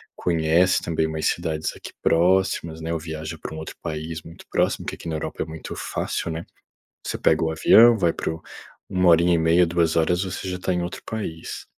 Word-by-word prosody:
conhece 85 +2 +2
também 80 -1 0
umas 80 0 -1
cidades 80 -2 -1 0.3
próximas 85 -2 +2
né 80 +1 -3
ou 80 - -1
viaja 80 0 -6
para - - -6
um - - -6
outro 80 - -7
país 80 +1 -5
muito 85 - -13
próximo, - - +1
porque - - -4
aqui - - -10
na 80 - -2
Europa 80 - -3
é - - -8
muito 80 0 -8
fácil - - -3
né? 80 +1 -5 0.6
Você - - -3
pega 80 0 +2
o 80 - +1
avião, 115 +8 +6
vai 85 -5 +2
para - - -3
o 80 - -10 0.5
1 90 -1 +3
horinha 85 +1 +5
e - - +2
meia, 85 +2 +4
2 85 -1 +1
horas 90 +3 +2
você 95 0 -5
já 90 - -3
está 90 +1 -1
em 90 - -1
outro 85 - -6
país. 90 -7 -5
80 Hz, 210 wpm, -23 LUFS, 80-90 Hz, 0.6 s, avião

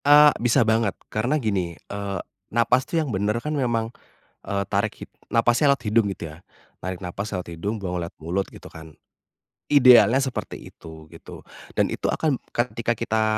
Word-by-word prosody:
Eee, 145 0 +8
bisa 120 +1 +3
banget. 110 -2 +1 0.2
Karena 120 +8 +1
gini, 95 - -2
eee, 100 0 -5 0.3
nafas 120 +3 +2
tuh 170 - -1
yang 150 -7 -1
bener 105 +3 0
kan 150 +6 -3
memang, 120 -5 -1 0.5
eee, 100 0 -1
tarik 105 +1 0
hid - - -9 0.2
nafasnya 120 +5 +4
lewat 140 - -2
hidung 110 0 +3
gitu 85 - -7
ya. 85 - -21 0.4
Tarik 95 -1 -4
nafas 100 +3 -5
lewat 90 -3 -4
hidung, 100 +6 -4
buang 90 -2 -3
lewat 85 -1 -4
mulut 90 +5 -1
gitu - - -12
kan. 80 -1 -12 0.7
Idealnya 125 -3 +6
seperti 130 -2 -4
itu 80 -1 -13
gitu, - - -12 0.3
dan - - +1
itu - - -5
akan 150 -5 +1 0.2
ketika 120 -1 0
kita 110 -1 0
110 Hz, 170 wpm, -24 LUFS, 95-125 Hz, 0.7 s, Eee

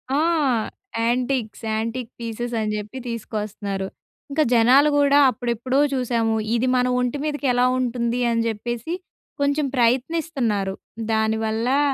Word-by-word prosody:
ఆ! - - +2 0.8
Antiques, 240 -1 -1
antique 230 +2 -2
పీసెసని 230 -1 -3
జెప్పి 210 +5 -5
తీసుకొస్తున్నారు. 210 -4 -4 0.4
ఇంకా 310 +2 +3
జనాలు 255 +6 +6
గూడా 285 0 +5
అప్పుడెప్పుడో 245 +2 -1
చూశాము, 235 -3 +1 0.2
ఇది 250 +2 +1
మన 250 0 +2
ఒంటి 250 +3 0
మీదకెలా 265 -5 +1
ఉంటుంది? 240 -1 -1
అని 230 0 +1
జెప్పేసి, 240 +7 -3 0.5
కొంచెం 285 +1 +2
ప్రయత్నిస్తన్నారు. 245 -5 +1 0.4
దానివల్లా 220 +4 +1
240 Hz, 105 wpm, -23 LUFS, 220-260 Hz, 0.8 s, జనాలు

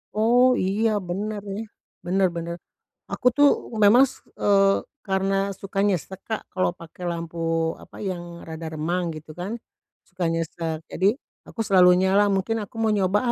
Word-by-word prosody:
Oh, 245 +4 +4
iya 210 +2 +1 0.2
bener 205 +3 -3
nih. 220 +2 -4 0.4
Bener 190 +2 +2
bener. 170 0 -4 0.6
Aku - - -5
tuh 290 0 +7 0.3
memang 230 +6 +7
s - - -14 0.2
eee, 195 -1 +4 0.2
karena 195 +1 0
suka 195 0 -7
nyesek, 190 0 -2
Kak, 220 - -2
kalau 185 -2 +1
pakai 170 0 -11
lampu, 170 0 -5 0.4
apa, - - -15
yang 175 -3 -5
rada 160 0 -7
remang 170 +3 -1
gitu 155 0 -10
kan, 180 +8 -5 0.5
suka 185 -2 -5
nyesek. 165 -1 -3
Jadi 195 +4 +2 0.3
aku 225 - -8
selalu 185 -3 +6
nyala, 200 +2 +4
mungkin 200 +3 0
aku 205 - -19
mau 220 -1 +3
nyoba 195 0 +2
190 Hz, 155 wpm, -24 LUFS, 175-205 Hz, 0.6 s, tuh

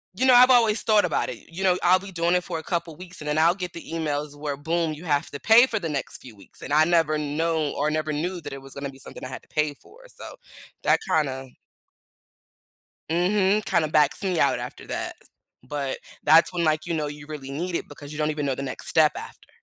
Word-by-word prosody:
you 255 - +1
know, 260 - +6
I've 250 +1 +8
always 230 -4 +4
thought 215 -2 +4
about - - -1
it, - - -6
you 190 +3 -5
know, 180 -1 +3
I'll 185 +1 +5
be 195 0 -10
doing 170 -1 +1
it 180 - +1
for 165 - -4
a 160 - -10
couple 170 -1 -3
weeks 180 0 -8
and 150 - -7
then 150 +1 0
I'll 165 +2 +5
get 180 -3 -5
the 170 - -8
emails 150 -2 -2
where 145 -1 -4
boom, 165 +2 -1
you 155 +4 -10
have 145 -1 0
to 140 - -6
pay 235 +3 +6
for 225 - -2
the 165 -4 -4
next 140 -3 -3
few 120 -4 -13
weeks 100 - -16
and 140 - -4
I 155 +1 +5
never 165 -3 +2
know 155 0 -1
or 150 +2 0
never 155 0 -1
knew 175 +4 -3
that 145 -3 -7
it 135 - -8
was 135 0 -12
gonna 140 0 -5
be 135 - -13
something - - -10
I - - -4
had 130 - -8
to - - -26
pay 150 -1 0
for, 435 - -19
so - - -9 0.5
that - - +4
kinda 135 -4 0 1.6
Mhm. 195 +4 +2
Kinda 155 -2 +1
backs 150 +5 +2
me 185 -4 0
out - - +3
after - - -8
that, - - -4 0.5
but 140 0 -3 0.2
that's 160 +4 +5
when, 175 -1 -1
like, 155 0 +1
you 170 - -1
know, 150 -2 -1
you 145 0 -9
really 145 -3 -7
need 170 +6 -4
it - - -3
because 145 0 -10
you 150 - -7
don't 155 0 +1
even 150 -1 -2
know 135 - 0
the 135 - -5
next 135 -2 -6
step 155 -2 +4
after. - - -10
155 Hz, 250 wpm, -25 LUFS, 145-180 Hz, 1.6 s, I've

